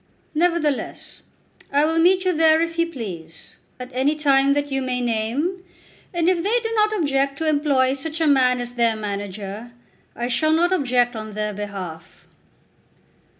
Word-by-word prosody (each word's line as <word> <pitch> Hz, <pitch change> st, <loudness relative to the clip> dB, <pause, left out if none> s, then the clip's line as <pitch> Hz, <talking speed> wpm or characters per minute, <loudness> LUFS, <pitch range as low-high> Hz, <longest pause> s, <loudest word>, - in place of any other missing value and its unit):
"Nevertheless, 320 Hz, -3 st, -1 dB, 0.5 s
I 285 Hz, +2 st, +3 dB
will 325 Hz, +1 st, +1 dB
meet 370 Hz, +2 st, +4 dB
you 365 Hz, -, +2 dB
there 320 Hz, 0 st, +4 dB
if 335 Hz, 0 st, -2 dB
you 335 Hz, -, +3 dB
please, 180 Hz, -, -8 dB, 0.3 s
at 250 Hz, 0 st, -8 dB
any 270 Hz, +4 st, +1 dB
time 280 Hz, -2 st, +3 dB
that 290 Hz, 0 st, -2 dB
you 270 Hz, 0 st, 0 dB
may 255 Hz, -1 st, -2 dB
name, 245 Hz, +11 st, -1 dB, 0.5 s
and 345 Hz, -2 st, 0 dB
if 360 Hz, -2 st, +2 dB
they 430 Hz, +7 st, +2 dB
do 450 Hz, -, -4 dB
not 430 Hz, -1 st, +2 dB
object 275 Hz, -4 st, 0 dB
to 320 Hz, -, -2 dB
employ 285 Hz, -4 st, +2 dB
such 310 Hz, +4 st, -5 dB
a 325 Hz, -, +2 dB
man 255 Hz, -4 st, +3 dB
as 245 Hz, 0 st, -5 dB
their 235 Hz, -2 st, +1 dB
manager, 205 Hz, +2 st, -6 dB, 0.4 s
I 240 Hz, -, -3 dB
shall 280 Hz, +6 st, +2 dB
not 345 Hz, +3 st, +2 dB
object 245 Hz, -6 st, +1 dB
on 215 Hz, -1 st, -6 dB
their 210 Hz, 0 st, -3 dB
behalf." 190 Hz, -5 st, -8 dB
275 Hz, 165 wpm, -22 LUFS, 235-320 Hz, 0.5 s, meet